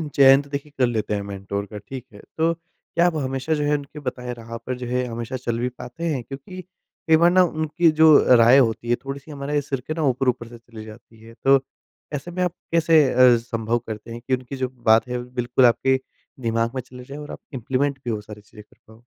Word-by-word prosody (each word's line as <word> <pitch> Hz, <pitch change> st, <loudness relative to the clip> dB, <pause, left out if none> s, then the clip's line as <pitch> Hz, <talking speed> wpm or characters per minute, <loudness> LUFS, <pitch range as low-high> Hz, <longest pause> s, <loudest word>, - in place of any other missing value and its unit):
चयन 135 Hz, 0 st, +7 dB
तो 145 Hz, -, -16 dB
देखिए 145 Hz, +1 st, -5 dB
कर 125 Hz, -2 st, +3 dB
लेते 110 Hz, -3 st, -2 dB
हैं 100 Hz, -, -1 dB
मेंटोर 100 Hz, +1 st, -4 dB
का 105 Hz, +1 st, -9 dB
ठीक 125 Hz, +5 st, -8 dB
है। 100 Hz, -, -13 dB, 0.2 s
तो 165 Hz, +1 st, +2 dB
क्या 170 Hz, +1 st, -3 dB
आप 175 Hz, -, 0 dB
हमेशा 135 Hz, +1 st, -2 dB
जो 150 Hz, -, 0 dB
है 145 Hz, 0 st, +1 dB
उनके 145 Hz, +1 st, -10 dB
बताए 125 Hz, -1 st, -7 dB
राह 115 Hz, 0 st, -8 dB
पर 125 Hz, +2 st, -5 dB
जो 125 Hz, -1 st, -6 dB
है 125 Hz, +1 st, 0 dB
हमेशा 120 Hz, +2 st, -5 dB
चल 115 Hz, 0 st, -1 dB
भी 125 Hz, -, -1 dB
पाते 125 Hz, +6 st, -10 dB
हैं? 130 Hz, -4 st, -3 dB
क्योंकि 140 Hz, +9 st, -9 dB
कई 170 Hz, -3 st, -1 dB
बार 170 Hz, +1 st, +5 dB
ना 185 Hz, 0 st, +6 dB
उनकी 160 Hz, 0 st, +1 dB
जो 150 Hz, -5 st, +7 dB
राय 120 Hz, +3 st, +7 dB
होती 120 Hz, -2 st, +1 dB
है 120 Hz, -, +4 dB
थोड़ी-सी 140 Hz, +2 st, -7 dB
हमारा 145 Hz, +1 st, -2 dB
सिर 135 Hz, -2 st, -1 dB
के 155 Hz, -, -2 dB
ना 160 Hz, -, -3 dB
ऊपर-ऊपर 125 Hz, -2 st, -1 dB
से 120 Hz, -, -12 dB
चली 115 Hz, -2 st, -12 dB
जाती 110 Hz, +1 st, -14 dB
है। 115 Hz, -, -13 dB
तो 135 Hz, 0 st, +6 dB, 0.6 s
ऐसे 150 Hz, +5 st, -6 dB
में 180 Hz, +1 st, -1 dB
आप 180 Hz, -, -1 dB, 0.2 s
कैसे 165 Hz, -2 st, +5 dB
अ, 125 Hz, -1 st, +6 dB
संभव 115 Hz, 0 st, -2 dB
करते 110 Hz, +1 st, -7 dB
हैं 120 Hz, -, -7 dB
कि 130 Hz, -, 0 dB
उनकी 130 Hz, +1 st, -8 dB
जो 130 Hz, -1 st, -2 dB, 0.2 s
बात 115 Hz, +2 st, +4 dB
है 125 Hz, 0 st, -3 dB, 0.2 s
बिल्कुल 120 Hz, +1 st, +3 dB
आपके 130 Hz, +2 st, +3 dB, 0.5 s
दिमाग 115 Hz, +2 st, 0 dB
में 130 Hz, -, -2 dB
चले 125 Hz, 0 st, -12 dB
जाए 140 Hz, +3 st, -9 dB
और 150 Hz, 0 st, -8 dB
आप -, -, -8 dB
इम्प्लीमेंट 135 Hz, +3 st, -1 dB
भी 120 Hz, -, -1 dB
वो 105 Hz, -, -3 dB
सारी 105 Hz, 0 st, -11 dB
चीज़ें 105 Hz, +1 st, -15 dB
कर -, -, -25 dB
पाओ? 110 Hz, +2 st, -18 dB
130 Hz, 235 wpm, -23 LUFS, 115-145 Hz, 0.6 s, चयन